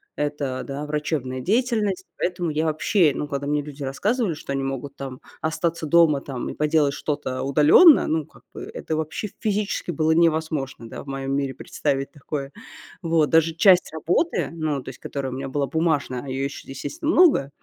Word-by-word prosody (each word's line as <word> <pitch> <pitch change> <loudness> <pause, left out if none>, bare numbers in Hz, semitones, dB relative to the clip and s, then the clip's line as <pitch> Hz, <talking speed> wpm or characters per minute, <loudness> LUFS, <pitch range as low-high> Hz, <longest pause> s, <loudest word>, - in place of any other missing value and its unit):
это, 145 -3 -2
да, 140 +1 -5
врачебная 150 -4 -2
деятельность. 210 - 0
Поэтому 175 -1 -1
я 155 +1 0
вообще, 160 +2 +3
ну, 150 - -3
когда 140 -1 -3
мне 150 0 +1
люди 145 0 -8
рассказывали, 200 - 0
что 145 -2 -6
они 135 - -1
могут 135 +1 -4
там 135 -2 -7 0.2
остаться 160 0 -1
дома, 155 -3 +4
там, 130 -3 -5
и - - -5
поделать 150 -2 +2
что-то 145 -4 -3
удалённо, 150 - +6
ну, 155 -1 0
как - - -21
бы, - - -8
это 160 - -3
вообще 160 +7 -3
физически 210 -4 -1
было 155 0 +1
невозможно, 160 -6 +1
да, - - -8
в - - -20
моём 135 0 -4
мире 135 -2 -1
представить 135 +1 -2
такое. 140 -1 -5 0.5
Вот. 165 -3 +2
Даже 165 0 +3
часть 185 0 +5
работы, 175 - 0
ну, 155 -4 -2
то - - -19
есть 130 - -11
которая 135 -2 -4
у - - -4
меня 135 0 -5
была 140 0 -1
бумажная, 150 -4 0
а - - -9
её 135 +1 -2
ещё, 140 - -7
естественно, 305 - -3
много, 330 - +5
150 Hz, 185 wpm, -23 LUFS, 140-165 Hz, 0.5 s, удалённо